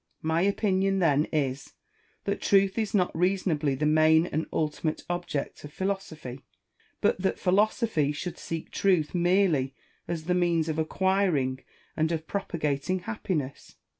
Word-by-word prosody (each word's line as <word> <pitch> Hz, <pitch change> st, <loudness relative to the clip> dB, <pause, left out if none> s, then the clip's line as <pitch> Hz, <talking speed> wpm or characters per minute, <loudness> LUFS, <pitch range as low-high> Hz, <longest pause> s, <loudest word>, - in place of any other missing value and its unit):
My 160 Hz, +1 st, +1 dB
opinion 195 Hz, 0 st, +1 dB
then 155 Hz, -5 st, +3 dB
is, 140 Hz, -3 st, -2 dB, 0.5 s
that 200 Hz, 0 st, -2 dB
truth 195 Hz, +1 st, +3 dB
is 215 Hz, -1 st, -1 dB
not 180 Hz, -3 st, +1 dB
reason 185 Hz, +2 st, +1 dB
ably 145 Hz, -3 st, 0 dB
the 150 Hz, +3 st, -1 dB
main 155 Hz, +1 st, +5 dB
and 160 Hz, -2 st, -2 dB
ultimate 155 Hz, 0 st, -2 dB
object 175 Hz, -5 st, -3 dB
of 150 Hz, -, -9 dB
philosophy; 160 Hz, -8 st, -4 dB, 0.6 s
but -, -, +2 dB
that 190 Hz, -, 0 dB
philosophy 200 Hz, -, +2 dB
should 170 Hz, +4 st, -5 dB
seek 165 Hz, -1 st, -5 dB
truth 180 Hz, -6 st, +2 dB
merely 175 Hz, -7 st, +2 dB, 0.3 s
as 165 Hz, -2 st, -3 dB
the 180 Hz, +3 st, 0 dB
means 170 Hz, -3 st, +1 dB
of 160 Hz, 0 st, -1 dB
acquiring 160 Hz, -6 st, +1 dB, 0.4 s
and 160 Hz, +1 st, +1 dB
of 160 Hz, -1 st, -2 dB
propagating 170 Hz, -2 st, -2 dB
happiness. 175 Hz, -, -4 dB
170 Hz, 140 wpm, -27 LUFS, 150-190 Hz, 0.6 s, main